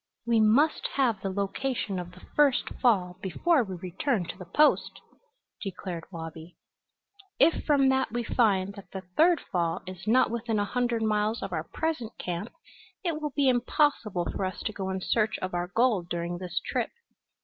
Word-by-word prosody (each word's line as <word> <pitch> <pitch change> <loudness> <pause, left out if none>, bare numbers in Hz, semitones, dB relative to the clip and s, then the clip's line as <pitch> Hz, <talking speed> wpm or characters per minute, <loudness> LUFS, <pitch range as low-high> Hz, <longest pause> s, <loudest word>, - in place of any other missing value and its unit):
"We 235 -1 +3
must 235 +9 +4
have 235 -8 +2
the 195 - -2
location 200 +1 -2
of 175 0 -7
the 180 - -15
first 290 -3 +3
fall 185 -7 +2
before 285 - +2
we 190 -4 -6
return 185 - -1
to - - -5
the 180 -1 -10
Post," 300 - +3 0.6
declared 180 -4 -5
Wabi. 165 0 -8 0.8
"If 330 - +4
from 280 -3 +4
that 265 -3 +1
we 240 +1 -1
find 200 -5 +2
that 200 -3 -12
the 190 - -4
third 335 0 +5
fall 170 -2 0
is 185 +1 -9
not 255 +3 +4
within 230 -1 -1
a 205 - +1
hundred 240 0 0
miles 215 +1 +1
of 195 -2 -4
our 160 -1 -2
present 275 - -3
camp 180 +5 -4 0.5
it 330 -4 -1
will 300 -2 -3
be 285 -2 +3
impossible 245 - +2
for - - -3
us 185 -1 -3
to 215 - -2
go 190 -2 -4
in 190 0 -2
search 215 +2 +1
of 185 0 -4
our 175 0 -1
gold 210 -4 +1
during 175 0 -3
this 180 -2 -2
trip. - - -1
210 Hz, 180 wpm, -28 LUFS, 180-250 Hz, 0.8 s, third